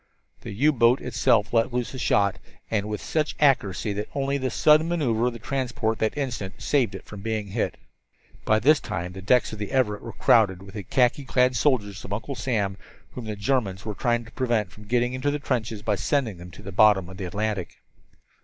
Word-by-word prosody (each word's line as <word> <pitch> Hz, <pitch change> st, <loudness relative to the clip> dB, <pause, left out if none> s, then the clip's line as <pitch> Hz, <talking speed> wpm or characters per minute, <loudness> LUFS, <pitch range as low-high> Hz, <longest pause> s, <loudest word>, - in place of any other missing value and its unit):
The -, -, -7 dB
U 145 Hz, +9 st, +3 dB
boat 120 Hz, -1 st, +4 dB
itself 115 Hz, -3 st, +1 dB
let 115 Hz, +2 st, +2 dB
loose 125 Hz, +1 st, -2 dB
a 130 Hz, -, -6 dB
shot, 100 Hz, -4 st, +2 dB, 0.3 s
and 105 Hz, -1 st, 0 dB
with 105 Hz, -, -4 dB
such 155 Hz, -1 st, -1 dB
accuracy 110 Hz, -8 st, +2 dB
that 105 Hz, +1 st, -4 dB
only 140 Hz, 0 st, 0 dB
the 130 Hz, -1 st, -1 dB
sudden 155 Hz, +6 st, +4 dB
maneuver 125 Hz, -9 st, +1 dB
of 125 Hz, -, -1 dB
the -, -, -7 dB
transport 120 Hz, -3 st, -2 dB
at 110 Hz, -, +1 dB
that -, -, -4 dB
instant 120 Hz, -9 st, -4 dB
saved 135 Hz, -5 st, +1 dB
it -, -, -9 dB
from 105 Hz, -2 st, -10 dB
being 110 Hz, -1 st, -3 dB
hit. 110 Hz, +3 st, -2 dB, 0.7 s
By 110 Hz, -, +3 dB
this 145 Hz, +8 st, +4 dB
time 90 Hz, +2 st, -5 dB
the 95 Hz, -, -8 dB
decks 120 Hz, +5 st, +2 dB
of 110 Hz, -, -7 dB
the 105 Hz, -, -4 dB
Everett 115 Hz, -6 st, +1 dB
were -, -, -8 dB
crowded 95 Hz, -5 st, +3 dB
with 95 Hz, -1 st, -12 dB
the 105 Hz, -, -5 dB
khaki 125 Hz, +8 st, +1 dB
clad 125 Hz, -1 st, +2 dB
soldiers 105 Hz, -, 0 dB
of 100 Hz, -, -6 dB
Uncle 110 Hz, +6 st, -4 dB
Sam 105 Hz, -7 st, -1 dB, 0.3 s
whom 125 Hz, -, -7 dB
the 110 Hz, -1 st, -4 dB
Germans 100 Hz, -3 st, -1 dB
were 105 Hz, -, -3 dB
trying 120 Hz, +3 st, 0 dB
to 115 Hz, -, -14 dB
prevent 115 Hz, -7 st, 0 dB
from 105 Hz, -, -14 dB
getting 120 Hz, +3 st, +1 dB
into 130 Hz, +3 st, -1 dB
the 145 Hz, -, 0 dB
trenches 115 Hz, -6 st, -3 dB
by 105 Hz, -, +1 dB
sending 110 Hz, 0 st, 0 dB
them 90 Hz, +1 st, -10 dB
to 90 Hz, -, -13 dB
the 100 Hz, -, -7 dB
bottom 95 Hz, -2 st, +4 dB
of 95 Hz, +1 st, -10 dB
the 95 Hz, -, -4 dB
Atlantic. 100 Hz, 0 st, -3 dB
110 Hz, 220 wpm, -25 LUFS, 100-130 Hz, 0.7 s, boat